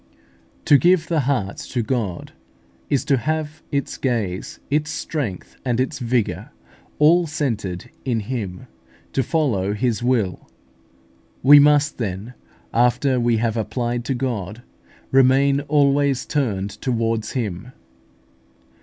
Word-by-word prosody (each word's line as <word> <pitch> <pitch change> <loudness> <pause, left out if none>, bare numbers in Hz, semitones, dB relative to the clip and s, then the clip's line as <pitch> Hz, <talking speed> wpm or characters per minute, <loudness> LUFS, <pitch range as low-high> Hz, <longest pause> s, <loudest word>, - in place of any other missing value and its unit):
To 145 - +6
give 175 -2 +3
the 165 -2 +2
heart 100 -8 -1
to 120 -2 -3
God 110 -7 -3 0.6
is 140 -1 +1
to 140 -3 +3
have 155 +4 -3
its 140 -1 -2
gaze, 110 -8 -2
its 150 +1 +1
strength, 145 - -4
and 125 -2 0
its 135 +3 -1
vigour 120 -3 -1 0.5
all 165 +3 +5
centred 115 - -3
in 120 -4 -1
Him, 100 -5 -5 0.5
to 135 - +2
follow 120 - 0
His 120 +1 -1
will. 120 -7 0 0.9
We 145 +2 +9
must, 145 0 +4
then, 105 +2 -4 0.4
after 125 +2 +2
we 120 -1 +2
have 115 0 0
applied 120 +1 -2
to 135 - -1
God, 120 -4 -4 0.5
remain 135 +1 +4
always 140 -2 +2
turned 105 -10 -1
towards 115 -3 -1
Him. 115 -1 -4
125 Hz, 120 wpm, -21 LUFS, 110-140 Hz, 0.9 s, We